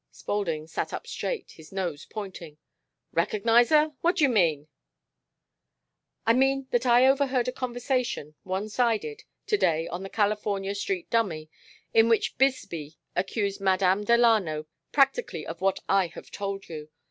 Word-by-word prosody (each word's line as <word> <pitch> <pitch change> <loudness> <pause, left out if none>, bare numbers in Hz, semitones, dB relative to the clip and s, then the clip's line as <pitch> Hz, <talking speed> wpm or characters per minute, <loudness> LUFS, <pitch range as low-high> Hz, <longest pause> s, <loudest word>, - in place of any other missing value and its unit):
Spaulding 165 -7 -3
sat 160 - -4
up - - -5
straight, - - -4
his 160 -1 -15
nose 180 -6 -4
pointing. 185 -7 -7 0.5
"Recognize 225 +7 +3
her? 305 0 +4
What 345 +2 +2
d'you 300 -6 +4
mean?" 165 - +2 1.6
"I 230 - +5
mean 270 +2 +2
that 240 +1 +1
I 245 +1 +6
overheard 265 -2 +2
a - - 0
conversation 245 - -2
one 190 +3 -3
sided 245 - -1 0.2
to 420 - +2
day 165 - +1
on 175 - -5
the 195 - -6
California 205 -2 0
Street 355 - -3
dummy, 165 -9 0 0.4
in 225 0 +5
which 230 - +1
Bisbee 170 - 0 0.2
accused 200 +1 -1
Madame 190 +1 +2
Delano 215 -9 +3 0.3
practically 275 - +1
of 165 +1 -7
what 195 0 +2
I 195 -2 +3
have 170 - -12
told 195 -1 -4
you. 155 -2 -8
210 Hz, 145 wpm, -27 LUFS, 180-250 Hz, 1.6 s, I